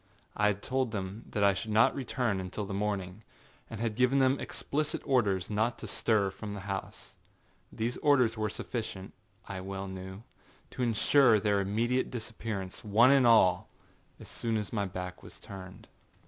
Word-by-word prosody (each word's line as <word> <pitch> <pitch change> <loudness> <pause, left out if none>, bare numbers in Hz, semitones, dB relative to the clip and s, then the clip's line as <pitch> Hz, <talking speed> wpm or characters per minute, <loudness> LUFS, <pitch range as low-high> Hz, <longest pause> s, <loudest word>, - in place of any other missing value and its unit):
I 105 - +3
had 105 0 -1
told 130 -1 0
them 100 +1 -5
that 105 - -1
I 100 -1 +5
should 110 +4 -5
not 110 +1 +4
return 125 -5 -1
until 95 +3 -4
the 100 - -6
morning, 100 -1 -2 0.5
and 110 - -7
had 115 -1 -1
given 125 +4 +2
them 135 0 +3
explicit 150 +1 -2
orders 100 -9 +2
not 110 +3 0
to - - -8
stir 105 -4 +1
from 105 +1 -7
the 100 - -6
house. 95 -1 -6 0.5
These 115 +2 -2
orders 125 -6 +3
were 110 -1 -1
sufficient, 100 -3 -5 0.3
I 95 -1 -5
well 95 +1 -5
knew, 95 +2 -8 0.5
to 130 - -6
insure 120 0 +4
their 100 -1 +2
immediate 115 +6 0
disappearance, 110 -5 -5
one 115 +5 +5
and 135 -3 +5
all, 110 -6 +5 0.5
as - - -11
soon 115 -1 -2
as 105 +1 -4
my 100 -3 0
back 90 -1 -6
was - - -13
turned. 95 -1 -10
105 Hz, 170 wpm, -30 LUFS, 95-120 Hz, 0.5 s, I